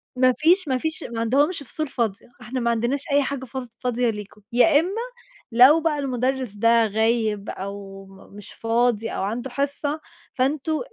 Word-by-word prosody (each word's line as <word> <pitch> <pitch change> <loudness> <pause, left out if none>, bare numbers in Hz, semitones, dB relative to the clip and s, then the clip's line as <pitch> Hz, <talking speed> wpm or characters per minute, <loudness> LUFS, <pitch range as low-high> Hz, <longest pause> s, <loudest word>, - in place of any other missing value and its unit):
ما 255 0 +4
فيش 350 +3 +3
ما 260 -2 +1
فيش 315 +4 -3
ما 230 -1 -5
عندهمش 285 +7 +1
فصول 310 +3 -4
فاضية، 225 -5 -2
إحنا 245 +3 -4
ما 235 0 +1
عندناش 240 +5 -1
أي 285 0 +4
حاجة 270 -1 -4
فص 260 0 -6
فاضية 245 -1 0
ليكم، 210 -1 -7
يا 290 +5 +5
إما 380 +8 -2 0.5
لو 255 +7 +7
بقى 300 -2 0
المُدرّس 255 -3 -1
ده 230 +2 +4
غايب 220 -1 0
أو 195 0 -7
م 195 +1 -16
مش 205 -1 -11
فاضي 230 -1 +1
أو - - -3
عنده 235 +6 -3
حصة، 285 +3 -2 0.3
فأنتم 295 +4 0
245 Hz, 170 wpm, -23 LUFS, 225-280 Hz, 0.5 s, لو